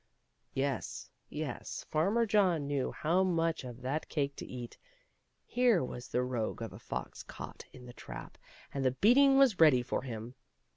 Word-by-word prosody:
'* - - -46
Yes, 135 -2 -2 0.2
yes. - - -5
Farmer 200 +10 +2
John 190 -8 +3
knew 140 -2 -1
how 170 +4 +1
much 165 -4 +1
of 125 0 -9
that 140 +5 -2
cake 140 -3 -1
to - - -6
eat; 120 -2 -7 0.7
here 245 - +3
was 125 -1 -6
the 125 - 0
rogue 120 -3 -2
of 115 - -6
a - - -10
fox 65 - -5
caught - - -9
in 125 -1 -12
the 120 - -10
trap, - - -9 0.3
and 140 - -1
the 130 -1 +2
beating 270 - +6
was 265 -8 +5
ready 145 -7 +6
for 125 - -2
him. 115 -1 -6
140 Hz, 175 wpm, -32 LUFS, 125-185 Hz, 0.7 s, beating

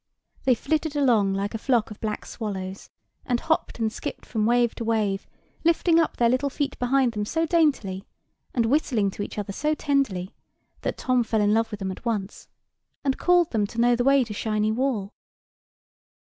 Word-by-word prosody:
They 255 -2 +5
flitted 305 +5 -1
along 225 -9 +3
like 200 +2 -2
a 225 - -3
flock 235 -3 +1
of 210 - -9
black 215 -1 -3
swallows, 195 -3 -6 0.3
and 245 -2 0
hopped 320 +2 -1
and 220 -2 -1
skipped - - -6
from 220 -2 0
wave 240 -1 +3
to - - -5
wave, 215 -3 0 0.4
lifting 335 0 +4
up 325 - 0
their 235 - +4
little 255 +4 +1
feet 280 +1 -3
behind 255 0 +2
them 210 -2 -3
so 325 +10 0
daintily, 275 - +1 0.4
and 235 -3 +1
whistling 230 -6 +1
to 205 - -7
each 205 - -5
other 205 -1 -3
so 305 +8 0
tenderly, 265 -12 0 0.5
that - - -2
Tom 255 -1 +2
fell 225 -1 0
in 205 0 +3
love 225 +1 +2
with 210 -2 -7
them 190 0 -2
at 185 - -9
once, 210 -4 -3 0.6
and 270 -2 0
called 355 -2 +3
them 210 -3 +1
to 230 - -7
know 240 +1 +4
the 245 - 0
way 275 0 +5
to 225 -3 -6
Shiny 215 0 0
Wall. 225 -4 -1
230 Hz, 190 wpm, -25 LUFS, 210-275 Hz, 0.6 s, They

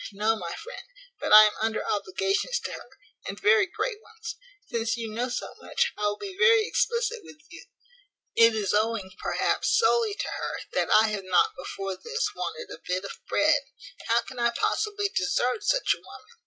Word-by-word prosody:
no, 215 +3 +1
my 170 -5 -5
friend, - - -9 0.4
but - - -3
I 215 0 +11
am 215 - +4
under 220 0 -1
obligations 390 - -1
to - - -5
her, - - -9 0.4
and 200 - -6
very 220 +8 +4
great 425 +4 -3
ones. 450 0 -9 0.3
Since 225 0 -1
you 225 -2 -5
know 245 +3 -2
so 245 - -4
much, 485 0 0
I 210 - -1
will 205 0 -1
be 390 -2 -7
very 460 -1 +6
explicit 470 +1 0
with 310 - -13
you. 330 - -11 0.7
It 230 -1 +6
is 210 -3 -1
owing, 215 -2 0
perhaps, - - +1
solely 455 -2 +3
to - - -3
her, - - -4
that - - 0
I 215 +1 +6
have 200 -3 -4
not, 180 -1 +3
before 195 +1 -5
this, 470 0 -1
wanted 475 +1 -5
a - - -12
bit 185 +1 -2
of 200 - -6 0.2
bread. 300 -1 +3 0.5
How 230 +1 +3
can 255 +1 -9
I 235 0 +3
possibly 410 - -1
desert 245 +7 0
such - - +2
a - - -10
woman? - - -14
235 Hz, 190 wpm, -26 LUFS, -, 0.7 s, I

